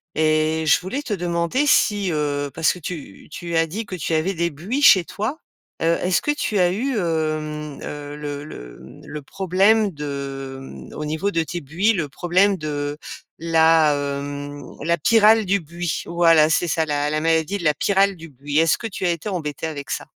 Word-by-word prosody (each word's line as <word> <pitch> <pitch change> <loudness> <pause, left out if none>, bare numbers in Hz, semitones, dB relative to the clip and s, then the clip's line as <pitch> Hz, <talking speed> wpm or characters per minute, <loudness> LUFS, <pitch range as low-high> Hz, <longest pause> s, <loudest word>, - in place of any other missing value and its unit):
et 155 +1 +1
je 150 - +5
voulais 195 +11 -4
te 230 - -3
demander 175 - 0
si, 205 -8 +3
heu, 145 -2 -1
parce 160 -1 +3
que - - -10
tu 150 - -8
tu 170 -1 -5
as 165 - +3
dit 210 +8 -5
que 185 - -5
tu 165 -1 -3
avais 165 +5 0
des 170 +1 0
buis 195 - -3
chez 185 -10 +7
toi? 220 - -4 0.4
Heu, 165 +1 +2
est-ce 180 0 +2
que - - -4
tu 215 -8 -1
as 175 -1 +4
eu, 255 +8 -1
hem, 155 -3 -2
heu, 145 0 -7
le 145 -1 -5
le, - - -10
mmh, - - -14
le 150 - -6
problème 195 +7 +2
de, 140 -3 -6
mmh, 135 - -11
au 150 - -4
niveau 160 +7 -1
de 165 - +1
tes 175 +3 -5
buis, 175 +10 +1
le 170 -6 -2
problème 185 +6 +2
de 145 -2 -3 0.4
la, 160 -2 +4
hem, 145 0 -4 0.2
la 170 +1 +1
pyrale 220 +4 +5
du 200 +2 +2
buis? 170 +1 -4
Voilà, 165 -2 +4
c'est 175 +3 +2
ça, 160 +1 +1
la 145 -1 -1
la 155 +1 0
maladie 165 +3 +1
de 185 - -8
la 150 - +4
pyrale 195 +4 +2
du 165 0 -11
buis. 145 +2 -2
Est-ce 165 -1 +3
que - - -8
tu 195 -2 -5
as - - +3
été 170 +4 -4
embêté 160 -6 -4
avec 145 -3 -7
ça? - - -3
165 Hz, 200 wpm, -22 LUFS, 150-185 Hz, 0.4 s, chez